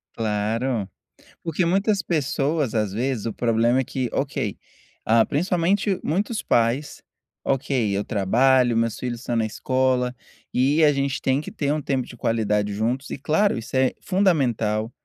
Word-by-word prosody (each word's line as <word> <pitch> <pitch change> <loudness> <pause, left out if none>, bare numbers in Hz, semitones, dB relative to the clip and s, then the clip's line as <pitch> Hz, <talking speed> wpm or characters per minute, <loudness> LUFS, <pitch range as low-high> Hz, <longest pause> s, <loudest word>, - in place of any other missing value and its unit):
Claro. 110 +1 -1 0.5
Porque 165 +1 0
muitas 195 +3 +2
pessoas, 150 - 0
às 105 -3 0
vezes, 120 +1 -2
o 115 - -2
problema 115 +3 +2
é - - +1
que 130 -1 -3
ok, 135 -7 -2 0.5
ah, 115 0 +4
principalmente 185 +4 +1
muitos 205 +7 -1
pais: 120 +5 0 0.4
"Ok, 125 -6 0
eu 100 - 0
trabalho, 120 +4 +3
meus 115 -1 0
filhos 120 -2 -4
estão 120 -2 -2
na 110 - +1
escola, 130 +2 0 0.4
e 140 +5 +3
a 150 - +6
gente 140 -1 -1
tem 135 +1 +1
que 150 - -6
ter 145 -1 -1
um 155 - -2
tempo 130 -2 -1
de 120 - -12
qualidade 105 -3 0
juntos" 120 +6 -2
e - - -4
claro 160 +9 +1
isso 115 +3 -6
é 130 0 +3
fundamental, 125 - +1
130 Hz, 155 wpm, -23 LUFS, 115-145 Hz, 0.5 s, a